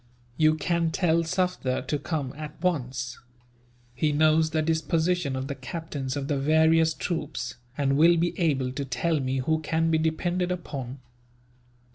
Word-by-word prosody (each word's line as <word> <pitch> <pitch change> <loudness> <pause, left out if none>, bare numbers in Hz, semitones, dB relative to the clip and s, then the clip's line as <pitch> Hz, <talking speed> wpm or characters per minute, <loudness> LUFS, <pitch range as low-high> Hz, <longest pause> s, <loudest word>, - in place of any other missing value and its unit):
You 155 +1 +4
can 170 +1 0
tell 165 0 +2
Sufder 180 -6 -1
to 150 - -1
come, 145 -3 -3
at 150 0 -8
once. 130 -8 -2 0.7
He 150 +5 +1
knows 155 +1 +3
the 160 -1 0
disposition 160 -1 0
of 130 0 -3
the 140 - -3
captains 140 -1 -5
of 140 -1 -3
the 140 -2 0
various 160 +2 +4
troops, 150 -7 -4 0.2
and 140 -1 +1
will 170 +3 +6
be 170 +1 +1
able 135 -7 +1
to 140 +2 -4
tell 140 +5 0
me 130 0 -1
who 160 +4 +1
can 165 +1 0
be 160 - +3
depended 175 +3 0
upon." 140 -7 -5
155 Hz, 155 wpm, -26 LUFS, 135-165 Hz, 0.7 s, will